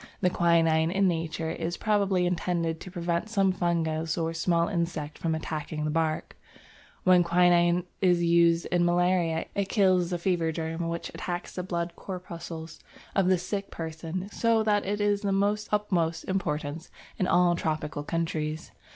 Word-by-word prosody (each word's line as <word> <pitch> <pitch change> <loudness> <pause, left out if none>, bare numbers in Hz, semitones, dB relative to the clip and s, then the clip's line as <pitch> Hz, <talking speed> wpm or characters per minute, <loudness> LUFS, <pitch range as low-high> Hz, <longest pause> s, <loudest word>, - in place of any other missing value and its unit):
The 180 -2 +3
quinine 165 -2 +3
in 195 +2 +2
nature 165 -1 -2
is 170 +1 -3
probably 200 -4 +1
intended 170 -2 -1
to - - -9
prevent 175 +2 -2
some 195 -3 +2
fungus 165 -3 -1
or 165 -1 -1
small 170 0 +1
insect 170 -5 -3
from 160 -1 0
attacking 155 -1 -4
the 155 - 0
bark: 160 0 -1 0.7
when 180 -1 +6
quinine 175 0 +4 0.2
is 175 -2 +3
used 170 0 +4
in 175 -1 +3
malaria, 175 -1 +2
it 200 -1 -1
kills 185 -4 +3
the 175 - -1
fever 170 -2 0
germ 165 +1 -3
which 170 0 -4
attacks 175 -1 -5
the 180 - -3
blood 170 -2 -3
corpuscles 170 -3 -7 0.4
of 195 -2 +3
the 185 0 +4
sick 200 +3 -4
person, 165 +3 -5
so 230 0 +2
that 205 -2 +1
it 205 +1 -1
is 205 0 +1
of 195 -1 +1
the 210 +1 +1
utmost 175 -6 0
importance 155 -4 -3 0.3
in 185 - +1
all 175 -1 +4
tropical 155 -3 -2
countries. 155 0 -3
170 Hz, 160 wpm, -27 LUFS, 165-185 Hz, 0.7 s, when